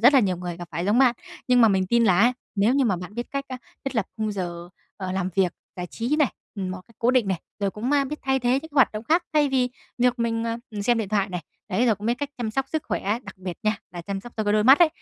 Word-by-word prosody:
rất 245 +6 +7
là 270 - +8
nhiều 185 -5 +1
người 175 -1 -5
gặp 175 -1 -8
phải 170 +3 -3
giống 210 +5 +3
bạn. 255 -3 +5 0.3
Nhưng 250 -1 +5
mà 225 - +7
mình 190 -2 +2
tin 235 +3 +3
là 185 -3 +4
á, 240 +4 +5 0.2
nếu 210 +6 +3
như 275 -2 +3
mà 195 -5 +2
bạn 180 +3 -8
biết 240 +1 -3
cách, 275 0 -2
a, 255 - -4 0.3
thiết 270 - -3
lập 220 - +1
khung 215 -1 -1
giờ, 175 -3 -5 0.3
ờ, 185 -2 -4
làm 190 -1 -1
việc, 185 -3 +2 0.2
giải 180 -1 -4
trí 240 - -1
này, 300 -4 +2 0.2
ừm, 190 -3 -3
một 185 0 -5
cách 230 - -23
cố 240 +2 +3
định 250 -6 +2
này, 185 -4 -1 0.2
rồi 200 - +1
cũng 225 +7 -3
ma 285 -1 +3
biết 300 +3 -5
thay 265 0 +2
thế 250 +1 +2
những 320 -2 -11
hoạt 270 -6 +4
động 215 +2 -5
khác, 335 +6 +3
thay 300 -2 +4
vì 255 -2 +2 0.3
việc 250 0 +3
mình, 230 -1 0
ờ, 230 0 -1
ừm, 210 -2 -4
xem 235 +2 +3
điện 215 - -2
thoại 200 -1 +1
này, 180 -2 -4 0.3
đấy, 215 +6 +2
rồi 225 - +4
cũng 205 +2 -7
biết 235 - +3
cách 285 -1 -3
chăm 230 -3 -2
sóc 270 +4 -1
sức 315 -2 -2
khỏe, 210 +4 0
đặc 190 -1 -11
biệt 185 -2 -5
nha, 215 0 +1
là 175 - -7
chăm 195 +3 -4
sóc 240 +4 -11
cho 215 - -1
cái 205 - +2
đôi 210 0 +3
mắt 265 +6 +8
ấy, 345 - +7
220 Hz, 310 wpm, -25 LUFS, 190-250 Hz, 0.3 s, là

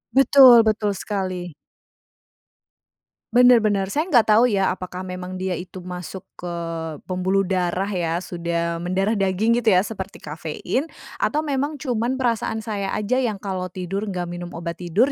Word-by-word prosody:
Betul 265 -3 +8
betul 215 -1 +1
sekali. 185 -4 -4 1.8
Benar 245 0 +7
benar. 200 -3 0
Saya 305 - 0
nggak 245 -10 +5
tau 225 +4 +6
ya? 195 -4 +1
Apakah 185 0 -6
memang 180 0 -6
dia 185 0 -3
itu 180 +1 -6
masuk 180 +1 -7 0.2
ke 180 - -6 0.6
pembuluh 185 +2 0
darah, 185 +1 -1
ya. 175 -2 -1
Sudah 170 -1 -2
mendarah 195 +5 0
daging 195 +4 +1
gitu, 235 - -7
ya? 185 - +4
Seperti 200 -3 -6
kafein. 165 - -3 0.3
Atau 305 +1 0
memang, 285 0 -1
cuma 245 -5 -2
perasaan 235 -4 -1
saya 205 -3 -3
aja, 230 +5 0
yang 235 -5 0
kalo 190 -2 -4
tidur 185 +3 -4
nggak 180 -3 -3
minum 175 0 -6
obat 170 0 -5
tidur, 195 - +2
195 Hz, 150 wpm, -22 LUFS, 180-225 Hz, 1.8 s, Betul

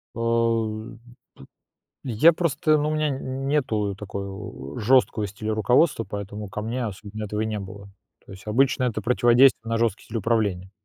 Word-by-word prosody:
О, 115 -1 +1 1.4
п - - -8
я 125 +9 +5
просто, 155 -1 +1
ну, 150 - 0
у - - -1
меня 155 0 +1
н 135 0 -4
нету 110 -9 0
такого 100 -8 -7
жёсткого 115 -2 +3
стиля 110 +2 -4
руководства, 125 +3 +2
поэтому 105 0 -6
ко 105 - -5
мне 120 +3 -3
особенно 105 0 -6
этого 105 +1 -3
и 110 - 0
не 110 -1 -3
было. 100 0 -9 0.4
То - - -11
есть 95 +1 -13
обычно 130 +4 +2
это 115 -3 -1
противодействие 120 +3 +4
на 115 - 0
жёсткий 115 -4 0
стиль 115 - -4
управления. 100 -4 0
110 Hz, 165 wpm, -24 LUFS, 105-130 Hz, 1.4 s, я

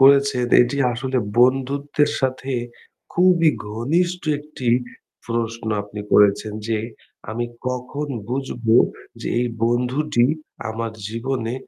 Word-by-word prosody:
করেছেন 140 -2 +5 0.2
এটি 120 +3 -2 0.2
আসলে 130 +2 -1 0.2
বন্ধুত্বের 140 +3 +2
সাথে 130 0 -1 0.6
খুবই 175 -2 +5 0.2
ঘনিষ্ঠ 170 +12 0 0.2
একটি 150 -4 -6 0.6
প্রশ্ন 115 -1 -2 0.2
আপনি 105 0 -8
করেছেন 105 +1 +4 0.2
যে 110 -1 +1 0.5
আমি 120 +2 -2 0.2
কখন 125 +4 -4 0.2
বুঝব 125 -2 -4 0.5
যে - - -5
এই 125 - +1 0.2
বন্ধুটি 125 +2 +1 0.4
আমার 115 0 -3 0.2
জীবনে 115 +1 -2
125 Hz, 105 wpm, -22 LUFS, 115-140 Hz, 0.6 s, করেছেন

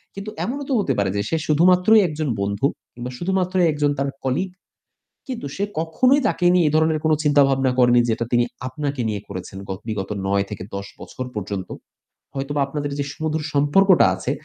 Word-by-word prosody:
কিন্তু 200 +2 -6
এমনও 280 +4 -3
তো 270 - +1
হতে 165 -10 +1
পারে 100 -2 +1
যে - - +1
সে 160 - +1
শুধুমাত্রই 180 +7 +5
একজন 155 -2 -3
বন্ধু 100 +6 -1 0.3
কিংবা 120 +1 -6
শুধুমাত্র 185 0 -1 0.2
একজন 145 -1 +1
তার 140 0 0 0.2
colleague. 180 +8 -1 0.7
কিন্তু 250 - -5
সে 200 - -2 0.2
কখনোই 250 - +3
তাকে 180 - -1
নিয়ে 175 -3 +4
এই 150 - 0
ধরনের 160 0 +2
কোনো 155 -1 +4
চিন্তাভাবনা 135 -3 +3
করেনি 120 -1 +5
যেটা 115 +1 0
তিনি 120 0 +4 0.2
আপনাকে 140 0 -3
নিয়ে 105 -2 -3
করেছেন 95 0 -7
গ - - -17 0.2
বিগত 100 -3 -3 0.2
৯ 100 0 +1
থেকে 100 -3 -6
১০ 100 0 -5
বছর 130 - -7
পর্যন্ত। 100 -2 -4 0.7
হয়তোবা 140 +1 -2
আপনাদের 145 0 -4
যে 140 - 0
সুমধুর 155 0 -2
সম্পর্কটা 170 +7 +5
আছে 95 - -3
145 Hz, 180 wpm, -22 LUFS, 120-175 Hz, 0.7 s, শুধুমাত্রই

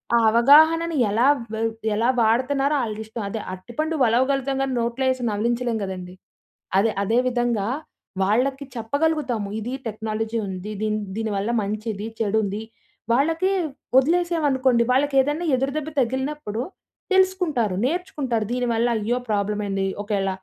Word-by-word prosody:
ఆ - - +6
అవగాహనని 315 +8 +5
ఎలా 225 +5 +2 0.3
వ 220 - -2 0.4
ఎలా 230 +3 +2
వాడతున్నారో 260 +6 +2
ఆళిష్టం. 220 0 -5
అదే 220 +2 -4
అరటిపండు 240 - -3
వలవగలుగుతాం 265 +3 +2
కానీ, 270 - -2
నోట్లో 235 +3 -1
ఏసి 255 -1 -4
నవిలించలేం 235 +2 0
గదండీ! 185 -1 -6 0.6
అదే, 215 +3 +3
అదే 225 +4 +1
విధంగా 240 -4 0 0.6
వాళ్ళకి 260 +8 +1
చెప్పగలుగుతాము 245 -3 -1
ఇది 235 +4 -4
టెక్నాలజీ 220 +1 -3
ఉంది. 190 +2 -6
దీని, 215 0 0 0.2
దీని 220 -1 -2
వల్ల 200 +4 -1
మంచిది 210 +1 -4
చెడుంది. 210 -1 0 0.5
వాళ్ళకి 325 +8 +2 0.5
వదిలేసాం 340 +4 +2
అనుకోండి 260 -3 +3
వాళ్ళకేదైనా 285 +4 +2
ఎదురుదెబ్బ 275 +4 -2
తగిలినప్పుడు 260 -2 -2 0.5
తెలుసుకుంటారు. 360 - +2
నేర్చుకుంటారు 280 - -1
దీనివల్ల 240 -2 +1
అయ్యో! 230 +4 -1
ప్రాబ్లమ్ 210 0 0
ఏండి 195 -1 -1 0.2
ఒకేళ 200 -2 -1
235 Hz, 120 wpm, -23 LUFS, 215-275 Hz, 0.6 s, ఆ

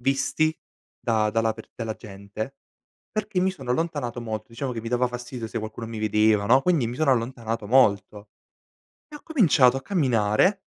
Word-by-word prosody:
visti 140 +4 +1 0.4
da 110 -2 +1
dalla 115 0 +1
per 110 0 -12
dalla 110 -2 -4
gente, 105 +3 -8 0.6
perché 210 -3 -2
mi 190 - +2
sono 135 -10 -7
allontanato 135 -4 -2
molto. 110 -1 -5
Diciamo, 125 +3 -4
che 115 - -4
mi 115 - -6
dava 125 +1 +2
fastidio 125 -1 -6
se - - -4
qualcuno 110 +1 -6
mi 115 -1 -6
vedeva, 105 -1 +3
no, 130 +5 +6
quindi 165 -10 +2
mi 120 - -5
sono 155 -3 +2
allontanato 115 -3 -2
molto. 105 -3 +2 0.8
E 300 - -11
ho - - -10
cominciato 160 - +4
a 135 - -5
camminare, 135 - +2
120 Hz, 175 wpm, -25 LUFS, 110-140 Hz, 0.8 s, no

